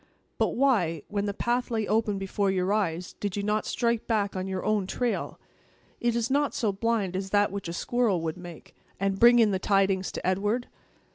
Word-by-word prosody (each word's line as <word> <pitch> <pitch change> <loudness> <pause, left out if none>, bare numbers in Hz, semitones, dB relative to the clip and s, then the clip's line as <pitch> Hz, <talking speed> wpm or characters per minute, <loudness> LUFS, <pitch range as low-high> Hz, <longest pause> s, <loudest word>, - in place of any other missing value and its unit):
But - - +1
why, 195 - +2
when 205 0 -1
the 200 - -1
path 245 +3 -1
lay 220 -3 -1
open 215 -2 +1
before 195 +1 -1
your 190 +1 +1
eyes, 180 -4 -1
did 205 -1 -3
you 200 - -2
not 210 +1 0
strike 235 -1 0
back 205 -4 0
on 185 0 -3
your 190 -1 -3
own 210 -3 +1
trail 245 +3 -2 0.6
(it 240 -1 0
is 235 +2 -1
not 285 +1 +1
so 220 -4 +1
blind 205 -2 -1
as 190 +1 -3
that 205 0 +2
which 200 -2 -5
a 170 - -4
squirrel 230 0 +1
would 160 -1 -3
make), 175 -3 -11 0.2
and 195 0 0
bring 240 +1 +7
in 225 -3 +5
the 190 - 0
tidings 195 -1 +1
to - - -5
Edward?" 205 +6 0
205 Hz, 205 wpm, -27 LUFS, 190-230 Hz, 0.6 s, bring